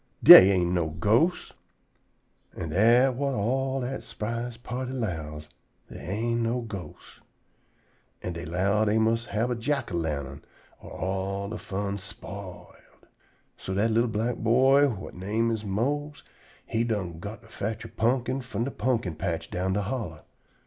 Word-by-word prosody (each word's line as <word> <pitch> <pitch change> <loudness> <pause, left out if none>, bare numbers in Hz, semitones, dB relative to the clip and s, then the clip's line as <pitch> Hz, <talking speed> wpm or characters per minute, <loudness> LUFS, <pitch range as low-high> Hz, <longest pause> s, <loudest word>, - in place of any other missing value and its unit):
"Dey 95 - +12
ain't 90 -3 +2
no 85 -3 +1
ghosts." 110 - +1 1.0
An' 80 - -4
dat 120 - +4
whut 135 +1 -1
all 130 +5 0
dat 130 +2 -4
s'prise 115 +2 -5
party 125 +2 -5
'lows: 80 -10 -4 0.4
dey - - -8
ain't 115 +5 -2
no 115 +2 0
ghosts. 100 -6 -9 1.0
An' 90 - -3
dey 85 0 -6
'low 95 +6 +1
dey 110 0 +2
mus' 115 +1 +1
hab 115 +4 -1
a - - 0
jack 130 +1 -2
o' - - -1
lantern 75 -4 -3 0.4
or 95 +1 -3
de 110 - -5
fun 100 0 -3
all - - -3
spiled. 95 -1 -10 0.5
So 95 - -4
dat 110 +3 +2
li'l 115 +2 +3
black 115 +2 -1
boy 130 +5 +4
whut 105 -8 -6
he - - -11
name 110 +5 0
is 110 -1 -3
Mose 140 +9 -2 0.4
he 115 +1 0
done 95 -8 -3
got 105 +5 -8
to - - -17
fotch 110 0 -5
a - - -6
pumpkin 125 +3 0
from 115 -3 -3
de 135 - -3
pumpkin 120 -10 -1
patch 80 +1 -4
down 95 +1 -1
de 100 +1 0
hollow. 100 - -5
110 Hz, 160 wpm, -27 LUFS, 95-120 Hz, 1.0 s, Dey